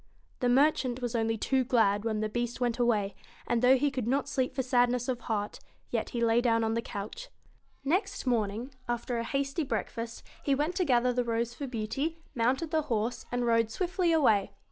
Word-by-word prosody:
The 245 - +2
merchant 260 -1 +3
was 245 -2 -3
only 225 -1 +1
too 260 +4 +1
glad 220 -5 +2
when 215 -2 0
the 215 - 0
Beast 240 +2 -3
went 245 -1 0
away, 215 -5 +2 0.3
and 235 -1 +1
though 255 +1 +6
he 285 +2 +1
could 255 -4 -3
not 275 +3 +1
sleep 260 -2 -1
for 265 - 0
sad 245 -1 +3
ness 245 0 -1
of 255 -2 -1
heart, 215 -3 -3 0.3
yet - - -1
he 240 - -3
lay 230 +1 +4
down 230 -2 +2
on 220 0 +1
the 230 - 0
couch. 220 - -6 0.6
Next 390 +6 0
morning, 235 +1 -1 0.2
after 240 0 -1
a - - -1
hasty 275 +5 -1
breakfast, 230 -1 -4 0.2
he 280 - +2
went 300 +5 0
to 365 - +2
gather 250 -2 +3
the 245 0 +1
rose 235 0 -1
for 280 +2 -5
Beauty, 260 +7 -2 0.2
mounted 260 +7 0
the 315 -1 +2
horse, 225 +1 -1
and 245 0 0
rode 230 -1 +3
swiftly 360 - 0
away. 220 -12 +4
245 Hz, 205 wpm, -30 LUFS, 230-270 Hz, 0.6 s, though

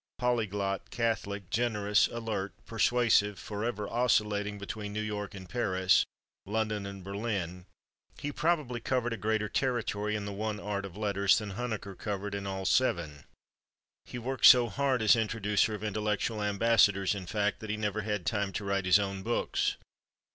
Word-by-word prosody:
Polyglot, 105 -5 -1
catholic, 100 -5 -2
generous, 105 -3 +2
alert, 110 -4 -4
persuasive, 115 -3 +2
forever 105 +1 -3
oscillating 105 -3 +1
between 100 +1 -6
New 105 - -2
York 105 -2 -4
and 95 -2 -9
Paris, 95 -5 +2 0.4
London 105 -1 -1
and 100 -1 -8
Berlin, 100 -3 -4 0.5
he 145 - -4
probably 150 -6 0
covered 120 0 -1
a - - -4
greater 110 0 0
territory 105 -4 -1
in 105 -1 -3
the 100 - -4
one 105 +1 -3
art 100 -1 -3
of 95 0 -13
letters 100 -2 +3
than 105 -2 -4
Huneker 110 -2 -4
covered 100 0 -4
in 100 -1 -4
all 95 0 -4
seven. 85 - +1 0.8
He - - -7
worked 130 +2 +3
so 120 -2 +8
hard 130 +1 0
as 110 - +7
introducer 110 -1 +1
of 105 - -8
intellectual 105 +1 -1
ambassadors, 105 -2 +3
in 95 -3 -6
fact, 105 0 0
that 110 - -8
he 105 - -1
never 105 0 -1
had 105 -4 -3
time 100 +3 0
to 105 - -4
write 100 -1 0
his 90 +1 +6
own 100 -1 -2
books. 120 +4 0
105 Hz, 160 wpm, -30 LUFS, 100-115 Hz, 0.8 s, so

